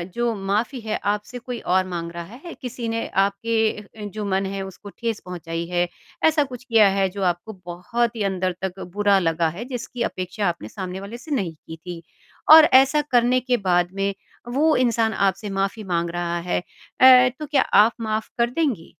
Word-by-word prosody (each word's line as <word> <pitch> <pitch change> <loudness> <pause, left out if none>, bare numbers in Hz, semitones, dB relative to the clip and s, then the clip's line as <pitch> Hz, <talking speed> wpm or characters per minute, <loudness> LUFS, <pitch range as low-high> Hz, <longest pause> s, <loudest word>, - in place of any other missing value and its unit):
जो 240 -1 0
माफ़ी 225 +6 -1
है 215 -1 -2 0.2
आपसे 210 +4 -7
कोई 245 -1 -6
और 185 +1 +1
माँग 170 -2 -5
रहा 170 - -4 0.2
है, 340 - -7
किसी 245 -2 -6
ने 230 0 -2 0.2
आपके 215 0 -2
जो 210 +2 -5
मन 195 0 0
है 195 0 -4
उसको 190 +2 -11
ठेस 230 -3 -2
पहुँचाई 170 -2 -5
है, 175 0 0 0.4
ऐसा 310 -2 +3
कुछ 255 -2 -9
किया 225 -5 +5
है 190 -1 +2
जो 195 +1 -5
आपको 175 +6 -9
बहुत 230 +7 -2
ही 215 - -2
अंदर 185 -2 -1
तक 190 0 -4
बुरा 205 -1 +3
लगा 165 -1 +1
है, 235 - -5
जिसकी 245 -1 -6
अपेक्षा 185 +2 -3
आपने 170 -11 -3
सामने 185 - -6
वाले 205 +4 -8
से 300 +5 -12
नहीं 180 -8 -2
की 160 +1 -11
थी 170 0 -8 0.5
और 315 -1 +10
ऐसा 275 +3 +4
करने 245 +1 +4
के 250 -1 0
बाद 180 -3 +1
में 195 0 -1 0.4
वो 310 +4 +3
इंसान 230 -3 +2
आपसे 200 +1 0
माफ़ी 195 +3 -2
माँग 170 -3 -1
रहा 175 0 -2
है - - +1
अ, 255 +6 +4
तो 305 - -4
क्या 285 -2 +2
आप 210 +3 +5
माफ़ 220 0 -2
कर 235 0 +2
देंगी? 255 - -2
205 Hz, 195 wpm, -23 LUFS, 185-240 Hz, 0.5 s, और